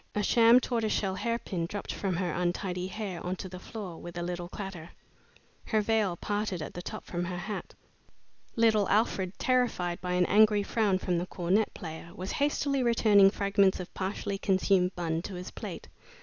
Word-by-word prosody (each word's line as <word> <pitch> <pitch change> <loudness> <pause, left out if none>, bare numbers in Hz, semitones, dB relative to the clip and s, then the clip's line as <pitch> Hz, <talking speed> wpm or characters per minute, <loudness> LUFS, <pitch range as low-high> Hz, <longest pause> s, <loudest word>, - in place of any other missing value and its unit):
A 210 - +1
sham 230 +3 +6
tortoise 230 -4 -1
shell 195 -2 0
hairpin 195 -5 -2
dropped 205 +3 -5
from 190 -3 -2
her 180 -2 -1
untidy 180 +1 -1
hair 190 -3 -5
on 180 +1 -2
to 190 - -7
the 180 0 -8
floor 190 -5 -7
with 175 0 -8
a 175 - -2
little 175 0 -4
clatter. 190 -4 -7 0.8
Her 220 - +1
veil 210 -4 +1
parted 205 0 -2
at 155 - -6
the 175 - -6
top - - -7
from 175 0 -3
her 180 0 -4
hat. 200 +4 -6 0.8
Little 220 -3 +3
Alfred, 200 -3 +1
terrified 240 -9 +1
by 180 0 -2
an 180 0 +3
angry 210 0 +5
frown 205 -2 +1
from 180 -2 -1
the 175 - -3
cornet 190 +4 +1
player, 160 -3 -7
was 185 +2 -5
hastily 285 -1 +1
returning 215 -5 +5
fragments 200 -1 +2
of 180 - -7
partially 195 +1 -3
consumed 190 -1 +2
bun 165 -2 -1
to 190 +1 -7
his 180 +1 -7
plate. - - -7
190 Hz, 180 wpm, -29 LUFS, 180-215 Hz, 0.8 s, sham